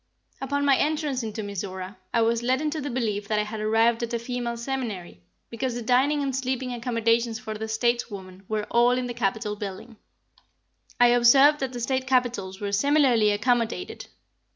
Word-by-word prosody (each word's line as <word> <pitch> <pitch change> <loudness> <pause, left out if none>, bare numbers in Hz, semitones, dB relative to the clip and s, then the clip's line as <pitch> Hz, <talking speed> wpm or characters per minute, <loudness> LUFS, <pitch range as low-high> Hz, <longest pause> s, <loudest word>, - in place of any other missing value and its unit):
Upon 285 +1 -1
my 275 -2 +5
entrance 300 -4 0
into 220 -1 -5
Mizora, 190 -1 -6 0.2
I 230 - +2
was 230 +1 +1
led 255 +2 +1
into 305 0 -2
the 285 - -4
belief 215 -5 -2
that 215 -1 0
I 210 - +2
had 215 +1 -6
arrived 225 +2 +2
at 235 0 -2
a - - +1
female 235 0 -4
seminary, 230 - -5 0.3
because 235 +1 -3
the 240 - -4
dining 270 +5 +2
and 270 -2 -2
sleeping 260 -1 -2
accommodations 230 -1 0
for 220 -2 -6
the 220 +1 -5
stateswoman 220 -5 -2
were 215 -1 -1
all 240 +1 +4
in 255 - -1
the 245 - -4
Capitol 215 -1 -1
building. 205 +2 -7 1.0
I 245 0 +7
observed 270 +5 +6
that 265 -1 -2
the 245 - -6
State 260 +2 -1
Capitols 245 -7 0
were 205 -1 -3
similarly 250 -1 +3
accommodated. 235 - -1
235 Hz, 175 wpm, -25 LUFS, 215-260 Hz, 1.0 s, I